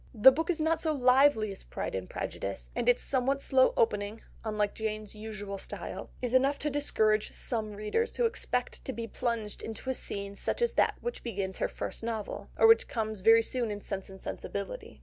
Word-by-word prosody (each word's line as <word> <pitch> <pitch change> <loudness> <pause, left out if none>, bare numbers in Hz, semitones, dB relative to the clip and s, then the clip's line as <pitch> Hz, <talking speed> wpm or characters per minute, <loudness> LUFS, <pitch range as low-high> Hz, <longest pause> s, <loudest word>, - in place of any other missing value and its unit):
The 225 +5 +9
book 320 +7 -2
is 345 -2 +1
not 320 +1 +1
so 315 -1 +1
lively 255 -4 +4
as 195 - -6
Pride - - -5
and 95 -1 -4
Prejudice, - - -5
and 245 - +1
its 245 - +3
somewhat 270 +1 +1
slow 265 -1 +4
opening, 210 -1 +1 0.2
unlike 210 -2 0
Jane's 215 -1 -4
usual 210 -2 -6
style, - - -7
is 245 -1 -1
enough 270 +2 +4
to 300 - -1
discourage 220 -7 +2
some 220 -4 -1
readers 210 - -1
who 485 - +2
expect 250 - -1
to 265 - -2
be 230 -1 -4
plunged 230 -2 -3
into 225 +4 -4
a - - 0
scene 200 -4 -3
such - - -2
as 475 - +1
that - - +3
which 480 - -4
begins 195 -5 -3
her - - +1
first - - -5
novel, 225 -3 -4
or - - +5
which 450 0 +7
comes 220 -2 -2
very 225 +3 +7
soon 240 -1 -1
in 205 -1 -4
Sense 195 -1 -5
and 190 0 -11
Sensibility. - - -6
225 Hz, 200 wpm, -30 LUFS, 210-265 Hz, 0.2 s, The